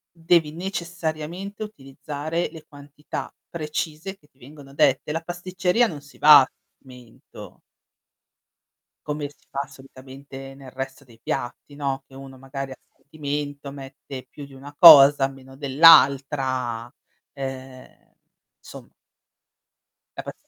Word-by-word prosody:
Devi 165 -2 +2
necessariamente 175 +2 -5
utilizzare 150 -2 -5
le 160 -2 -12
quantità 145 +1 -8 0.2
precise 160 +3 -5
che 150 - -27
ti 130 - -39
vengono 140 +1 -14
dette. 140 0 +2
La 165 +2 -2
pasticceria 180 +5 0
non 150 -8 -8
si 145 0 -18
va 150 -1 +9
a 130 - -1 0.3
sentimento 125 -3 -15 1.5
come 150 -1 -4
si 145 - -26
fa 140 +1 -3
solitamente 135 0 -12
nel 135 -2 -13
resto 135 +1 -7
dei 115 -3 -20
piatti, 135 +2 -5
no? 135 -2 -3
Che 135 - -18
uno 135 -1 -11
magari 135 +1 -7
a - - -7 0.2
sentimento 145 -1 -6
mette 135 -1 -10
più 145 - -10
di 140 - -16
una 140 +2 -12
cosa, 145 -4 +9
meno 135 -1 -14
dell'altra, 135 -4 +4 0.4
ehm, 135 -1 -9 0.5
somma - - -13 1.3
La - - -5
pastic - - -7
140 Hz, 125 wpm, -23 LUFS, 135-155 Hz, 1.5 s, va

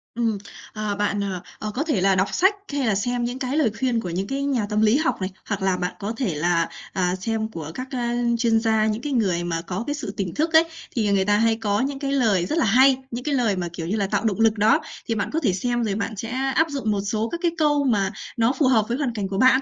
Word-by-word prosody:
Ừm, 230 -3 0 0.4
ờ, 215 -1 -2
bạn, 205 0 0
ờ, 190 -3 -3 0.2
ờ, 215 - -4
có 275 - 0
thể 295 - 0
là 195 0 +4
đọc 190 +1 +2
sách 380 +3 +4 0.2
hay 280 -4 0
là 215 - +2
xem 245 +4 -1
những 245 +2 -3
cái 265 +2 -2
lời 275 -9 +3
khuyên 250 -3 +1
của 205 - -4
những 185 +3 -2
cái 275 +4 -2
nhà 265 -6 0
tâm 210 0 +1
lý 220 +4 +4
học 315 +2 +1
này, 185 - -1 0.2
hoặc 200 -1 -2
là 190 -1 +1
bạn 180 0 -2
có 205 +2 -3
thể 215 - -1
là, 170 +2 +1 0.2
à, 180 -1 +1
xem 220 +3 -2
của 160 -5 -6
các, 255 +5 -5
a, 240 -2 -1 0.2
chuyên 230 -1 +3
gia, 220 -1 +2
những 215 +1 -1
cái 290 +2 -3
người 190 -8 +1
mà 170 -1 -2
có 180 +5 -4
cái 290 - 0
sự 290 -9 -5
tỉnh 190 -4 -2
thức 320 +2 -1
ấy, 320 +1 +8 0.3
thì, 220 -4 +1
à, - - +2
người 195 -1 +2
ta 205 +1 +3
hay 225 +1 +3
có 210 -2 0
những 270 +1 -2
cái 275 -1 -2
lời 220 -10 +2
rất 305 - -2
là 320 - +3
hay. 260 +5 +5
Những 240 +1 -4
cái 290 0 0
lời 230 -6 +2
mà, 180 -2 -2
kiểu 165 -1 -5
như 195 - -1
là, 200 -3 0
tạo 215 - -1
động 215 -2 0
lực 225 -1 +3
đó, 210 +2 +4 0.3
thì 230 - 0
bạn 215 - -1
có 320 - +2
thể 230 - +1
xem 240 +5 -1
rồi 205 -3 -1
bạn 225 +1 -3
sẽ 225 +3 -5 0.3
áp 320 - +4
dụng 275 -7 -1
một 200 -1 0
số 215 +3 -1
các 340 - -4
cái 340 - +3
câu 295 -2 +3
mà 205 -7 +1 0.3
nó 230 +2 +3
phù 285 -2 +2
hợp 225 -5 +4
với 240 - -1
hoàn 270 -5 -1
cảnh 200 -3 -2
của 195 0 -4
bạn. 260 +3 +5
225 Hz, 290 wpm, -23 LUFS, 195-260 Hz, 0.4 s, ấy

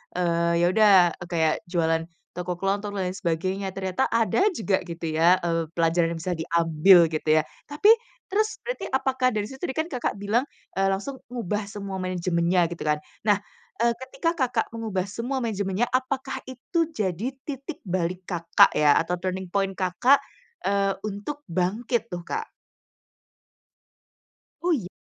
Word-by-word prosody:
eee, 170 -1 +1
ya 175 - +4
udah 215 0 +5 0.4
kayak 160 -2 +2 0.2
jualan 165 -2 +1 0.3
toko 180 0 -4
kelontong 200 +1 -1
dan 185 - 0
lain 185 - -4
sebagainya 190 +2 -2
ternyata 190 +5 -1
ada 230 - +2
juga 210 - 0
gitu 170 -1 -7
ya, 175 +3 +5
eee, 165 -1 0
pelajaran 165 0 +2
yang 165 - -4
bisa 180 +1 -2
diambil 165 +2 +5
gitu 155 -1 -3
ya, - - +3 0.3
tapi 310 +8 +2 0.4
terus 430 +2 0
berarti - - -3
apakah 260 -1 +1
dari 210 -1 -2
situ 265 +1 -11
tadi - - -1
kan, 320 - 0
Kakak, 250 - -3
bilang, 215 +5 +1 0.3
eee, 195 +1 +2
langsung 205 +8 -3 0.2
ngubah 210 -3 -2
semua 200 -2 -5
manajemennya 175 -1 +1
gitu 170 0 -6
kan. 150 0 +2 0.3
Nah, 205 -2 +4 0.4
eee, 235 0 +3
ketika, 330 +6 -1
Kakak, 250 -6 0
mengubah 210 -5 -2
semua 240 +7 -3
manajemennya, 205 -1 -1
apakah 265 +1 -1
itu 320 +6 -1
jadi 210 - -2 0.2
titik 275 -1 -6
balik, 180 +1 -2
Kakak, 170 -2 +4
ya 150 -1 +5
atau 175 +2 -1
turning 185 0 -3
point, 195 +1 0
Kakak, 195 +9 +4 0.5
eee, 195 0 +1
untuk 210 +9 -5
bangkit 215 +7 -1
tuh, 175 -1 -5
Kak? 450 0 -3 2.1
Oh, 355 - +2
iya? 225 - 0
195 Hz, 155 wpm, -25 LUFS, 175-240 Hz, 2.1 s, udah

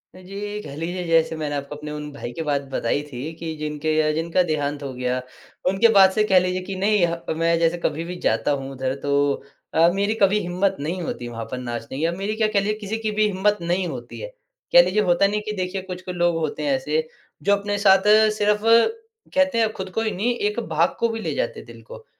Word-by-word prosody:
अ, - - -12
जी, 205 +3 -6
कह 140 - -9
लीजिए 175 +4 -3
जैसे 165 -1 +3
मैंने 150 -2 -3
आपको 140 +1 -5
अपने 150 0 -7
उन 150 0 -6
भाई 125 -3 -6
के - - -2
बाद 145 -2 0
बताई 135 +1 -1
थी 125 -1 -6
कि 160 0 -5
जिनके 150 +1 -2
अ, 155 - +1
जिनका 165 +3 +1
देहांत 145 -1 -1
हो 135 -2 -5
गया, 125 0 -2 0.5
उनके 195 +5 +4
बाद 190 -1 +8
से 215 +2 +2
कह 185 - +8
लीजिए 180 0 -1
कि 190 +1 -6
नहीं 205 -2 +3
ह 170 0 -3 0.2
मैं 165 0 +2
जैसे 165 +1 +2
कभी 160 +3 -1
भी 180 +1 -6
जाता - - +2
हूँ 135 -1 -3
उधर 130 0 -2
तो 145 - -1 0.6
अ, 165 +1 +5
मेरी 200 +2 +1
कभी 200 +2 +4
हिम्मत 185 +1 0
नहीं 165 +6 -3
होती 125 -7 -4
वहाँ 115 -1 -6
पर 125 - -3
नाचने 120 0 -5
की 150 - -2
या 165 - +1
मेरी 195 +5 -3
क्या 220 -1 +2
कह 210 -2 +2
लीजिए 205 +2 0
किसी 215 +1 -3
की 215 - 0
भी 215 - +5
हिम्मत 205 +1 +1
नहीं 175 +2 0
होती 125 -5 -7
है। - - -5 0.5
कह - - +10
लीजिए 215 - +1
होता 180 0 +3
नहीं 210 +1 -1
कि 215 - -3
देखिए 185 +1 -2
कुछ-कुछ 180 -1 -7
लोग 175 -1 +2
होते 155 -1 -3
हैं 145 -2 +1
ऐसे, 150 +4 -1 0.4
जो 200 - +4
अपने 205 0 -2
साथ 195 -1 +5 0.3
सिर्फ़ 210 0 +2 0.7
कहते 280 -3 +3
हैं 225 -1 +2
खुद 190 -2 -6
को 225 - +1
ही 220 -1 0
नहीं, 220 +6 0
एक 210 0 -1
भाग 165 +2 +1
को 235 - +2
भी 225 - -3
ले - - -2
जाते - - -2
दिल - - -13
को। - - -12
175 Hz, 240 wpm, -23 LUFS, 150-205 Hz, 0.7 s, कह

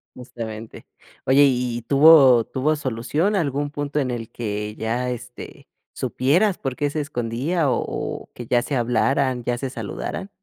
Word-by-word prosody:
Justamente. 115 -3 -8 0.4
Oye 135 +2 +5
¿y 125 -2 0
y 120 - -6
tuvo 135 -2 +7
tuvo 150 +4 0
solución? 145 - -1
¿Algún 145 -4 -1
punto 145 0 -3
en 130 -3 -1
el 115 -2 -5
que 105 -2 -4
ya, 120 +3 -2
este, 125 0 -8 0.3
supieras 175 +10 +1
por 135 -2 -3
qué 145 +1 -1
se 155 - -2
escondía 140 +4 -1
o - - +1
o - - -5
que 120 - -8
ya 120 +1 +2
se 140 - -3
hablaran, 125 +1 +1
ya 120 0 -1
se 130 0 -4
saludaran? 120 - -5
130 Hz, 160 wpm, -22 LUFS, 120-145 Hz, 0.4 s, tuvo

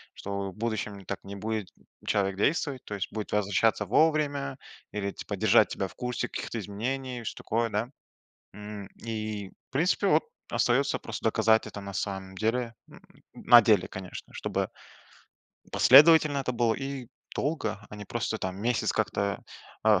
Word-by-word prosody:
что 100 0 -4
в 95 - -12
будущем 105 -3 -3
так - - -4
не 100 +1 -8
будет 110 0 -3 0.4
человек 95 -1 +1
действовать, 140 - 0
то 105 - -5
есть 100 0 -4
будет 110 -2 -4
возвращаться 105 +1 +2
вовремя 145 - +2 0.3
или, 100 -1 -2
типа, - - -6
держать - - +5
тебя 95 - -2
в - - -16
курсе 125 0 -3
каких-то - - -5
изменений, 120 +5 -3
что-то - - -6
такое, 115 +1 0
да? 105 +3 -1 0.6
М, 105 0 -8 0.2
и, 110 -3 -4 0.2
в - - -59
принципе, 180 +7 +2
вот, - - +4 0.3
остается - - +2
просто - - -6
доказать 110 0 +3
это 105 -1 -7
на 100 0 -7
самом 95 -1 -4
деле 115 +3 -1 0.6
на 120 - +7
деле, 105 -4 +3
конечно, 95 -1 -8
чтобы - - -2 1.0
последовательно 155 -1 +7
это 130 -2 -1
было 115 -2 +2
и 135 -1 -5 0.3
долго, 140 -9 -1
а 105 - -9
не 105 - -7
просто 115 0 -2
там 95 -2 -4
месяц 120 +2 +1
как-то, 100 0 -1 0.5
э, - - +6
110 Hz, 155 wpm, -28 LUFS, 100-125 Hz, 1.0 s, на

